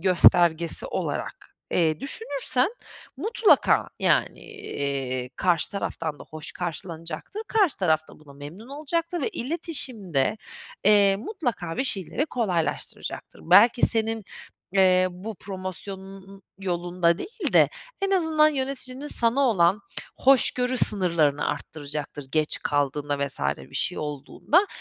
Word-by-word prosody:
göstergesi 170 -2 +4
olarak, - - -5
eee, 160 -3 +1
düşünürsen 275 - 0 0.5
mutlaka, 450 -1 +3
yani, - - +1
eee, 140 - -4
karşı 175 -4 +1
taraftan 165 -6 -4
da - - -11
hoş 155 -1 -4
karşılanacaktır, 170 - -5
karşı 400 - +2
taraf 160 -5 +2
da - - -15
buna 150 -2 -16
memnun 150 - -11
olacaktır 330 +4 -2
ve - - 0
iletişimde, 240 - -1 0.5
eee, 200 -1 +5
mutlaka 230 - -4
bir 265 - 0
şeyleri 230 - -1
kolaylaştıracaktır. 195 - -3
Belki 215 +8 +6
senin, 225 -2 0 0.5
eee, 185 -1 +4
bu 200 +5 -7
promosyonunun 190 +1 -8 0.2
yolunda 175 -1 0
değil 435 - -4
de - - +6 0.3
en 390 - +1
azından 320 -5 +4
yöneticinin 265 -1 -4
sana 240 0 +2
olan 200 -6 +3 0.4
hoşgörü 255 -1 +3
sınırlarını 165 -8 +2
arttıracaktır, 145 -1 -5
geç 155 -1 +1
kaldığında 145 0 -1
vs. 130 - -6 0.2
bir 65 - -14
şey - - 0
olduğunda. 150 - 0
195 Hz, 115 wpm, -25 LUFS, 160-260 Hz, 0.5 s, Belki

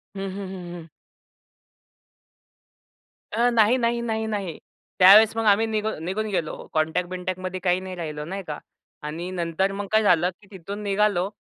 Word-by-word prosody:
हं, 195 0 -4
हं, 195 -1 -5
हं, 175 -2 -8
हं. 165 -1 -10 2.5
अ, 240 +2 +3
नाही, 230 +2 +4
नाही, 235 0 0
नाही, 220 -1 -2
नाही. 200 -6 -3 0.4
त्यावेळेस 210 +4 +8
मग 225 - 0
आम्ही 210 +2 +4
निघून 215 -6 -2
निघून 215 +4 -2
गेलो 165 -5 -2 0.2
कॉन्टॅक्ट 160 +3 0
बिनटॅकमध्ये 185 0 -4
काही 180 0 +2
नाही 185 -1 -7
राहिलं, 155 -3 -5
नाही 195 +1 -5
का. 150 -1 -4 0.5
आणि 165 +4 -5
नंतर 180 +2 -1
मग 200 0 -5
काय 220 0 +4
झालं 180 -3 +4
की 200 - -19
तिथून 200 +3 -7
निघालो 200 -2 +1
190 Hz, 160 wpm, -24 LUFS, 175-215 Hz, 2.5 s, त्यावेळेस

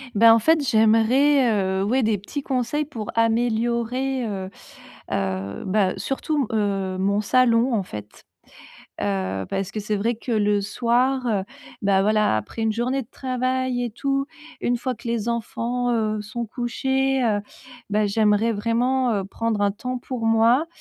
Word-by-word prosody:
Bah, 225 +2 +7
en 230 - +4
fait, 315 +7 +3
j'aimerais, 235 +5 +4 0.3
heu, - - +1
ouais, 245 +5 +1
des 215 -1 +2
petits 245 +9 -6
conseils 270 +3 -1
pour 230 -8 -6
améliorer, 235 +3 0
heu 195 -3 -4 0.6
heu, 95 0 -2
bah, 190 -1 +2
surtout 280 0 -1
m 220 - +1
heu, 195 -2 -1
mon 200 +2 +1
salon, 240 +2 +3
en 210 - +1
fait. 105 - -10 0.8
Heu, 95 -1 -1
parce 195 0 -2
que 215 - -4
c'est 210 +1 -2
vrai 225 +4 0
que, 235 +2 -5
le 205 -2 +2
soir, 250 +4 +1
heu, 205 -5 0 0.4
bah 195 -1 +3
voilà, 215 - +2
après 110 - -4
une 220 0 +1
journée 250 +4 -1
de 230 - -17
travail 255 -1 -1
et 240 - -3
tout, 275 +4 -1 0.4
une 245 - +1
fois 255 +1 -2
que 235 +2 -13
les 230 -1 -1
enfants, 235 +1 -2
heu, 215 -2 0
sont 220 +3 -5
couchés, 265 +3 0
heu 215 -4 +1 0.5
bah, 210 0 +2
j'aimerais 210 +2 +2
vraiment, 240 +4 +1
heu, 195 -2 -1
prendre 220 +2 -2
un 200 - +3
temps 250 +5 -4
pour 245 -2 -4
moi, 230 +6 +4
230 Hz, 165 wpm, -23 LUFS, 205-250 Hz, 0.8 s, Bah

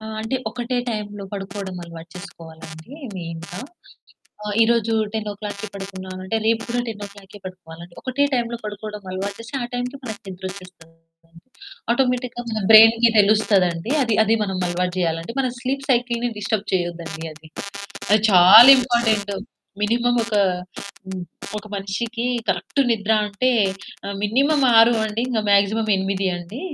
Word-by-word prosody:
ఆ! 220 - -9
అంటే, 225 +4 -2
ఒకటే 245 +2 -3
టైం‌లో 205 -2 -5
పడుకోవడం 195 -1 -6
అలవాటు 165 -1 -11
చేసుకోవాలండి 165 - -11 0.2
మెయిన్‌గా. 170 +1 -7 0.8
ఆ! - - -7 0.2
ఈ - - +8
రోజు 230 -1 +1 0.2
10:00కి 210 -1 -5
పడుకున్నా 195 -1 -8 0.2
అంటే 225 +4 -1
రేపు 225 0 +2
కూడా 245 +1 0
10:00కే 205 -2 -9
పడుకోవాలండి. 170 -2 -11
ఒకటే 270 +2 0
టైం‌లో 235 -2 -1
పడుకోవడం 210 0 -7
అలవాటు 195 +2 -4
చేస్తే 230 +5 -8
ఆ - - -2
టైంకే 250 +2 -3
మనకి 220 -4 -7
నిద్రొచ్చేస్తూ 185 -1 -9
ఉంటుంది. 165 0 -24 0.5
ఆటోమేటిక్‌గా 250 -1 0
మన 220 -1 -2
బ్రెయిన్‌కి 225 +2 +8
తెలుస్తదండి. 200 -2 +2
అది, 230 -4 0
అది 225 +2 +3
మనం 190 -2 -3
అలవాటు 180 +1 -2
జేయాలంటే, 165 +4 -2
మన 260 - 0
స్లీప్ 275 +3 -3
సైకిల్‌ని 240 -1 0
డిస్టర్బ్ 210 0 -2
చేయొద్దండి 170 -3 -3
అది. 155 +1 -16 0.6
అది 210 0 +5
చాలా 185 +8 +9
ఇంపార్టెంట్. 225 -5 +1 0.5
మినిమమ్ 240 +3 +1
ఒక, 225 -1 -3 0.7
హ్మ్. 190 -1 -6 0.4
ఒక 210 - -9
మనిషికి 225 +5 -3 0.2
కరెక్ట్ - - -2
నిద్ర 220 -1 0
అంటే, 210 +5 0 0.6
ఆ! - - -5 0.2
మినిమమ్ 275 +7 +2
6 225 +1 +7
నుండి 220 +1 -1
ఇంక 240 -3 0
మ్యాక్సిమమ్ 205 +2 +3
8 190 0 -1
అండి. 175 +9 -8
205 Hz, 140 wpm, -21 LUFS, 185-230 Hz, 0.8 s, చాలా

